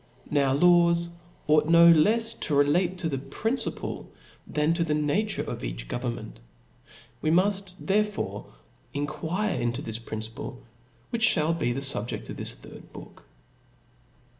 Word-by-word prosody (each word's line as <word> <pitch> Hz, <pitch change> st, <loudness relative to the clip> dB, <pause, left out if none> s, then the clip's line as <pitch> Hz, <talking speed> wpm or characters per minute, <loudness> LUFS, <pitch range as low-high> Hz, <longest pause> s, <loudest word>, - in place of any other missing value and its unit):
Now 140 Hz, -2 st, +3 dB
laws 170 Hz, +2 st, +4 dB, 0.4 s
ought 155 Hz, 0 st, +6 dB
to -, -, -6 dB
be 165 Hz, -, +3 dB
no 170 Hz, 0 st, +9 dB
lefs 225 Hz, +8 st, +3 dB, 0.2 s
relative 155 Hz, +6 st, +2 dB
to 165 Hz, -, -1 dB
the 135 Hz, -3 st, -2 dB
principle 225 Hz, -, -3 dB, 0.4 s
than 150 Hz, +2 st, +1 dB
to 170 Hz, 0 st, +1 dB
the 155 Hz, -2 st, 0 dB
nature 150 Hz, +9 st, 0 dB
of -, -, -6 dB
each -, -, -5 dB
government. 120 Hz, -, -5 dB, 0.8 s
Wc 155 Hz, -, +2 dB
muft 195 Hz, 0 st, +1 dB
therefore 210 Hz, +1 st, -1 dB, 0.5 s
enquire 160 Hz, +6 st, -2 dB
into 120 Hz, +3 st, -2 dB
this 110 Hz, 0 st, -4 dB
principle, 110 Hz, +2 st, -7 dB, 0.5 s
which 235 Hz, 0 st, +3 dB
Ihall 155 Hz, +2 st, +1 dB
be 120 Hz, -, +1 dB
xhe 120 Hz, -, -3 dB
fubjeft 120 Hz, -, -3 dB
of -, -, -6 dB
this -, -, -4 dB
third -, -, -13 dB
book. -, -, -12 dB
155 Hz, 140 wpm, -27 LUFS, 130-185 Hz, 0.8 s, no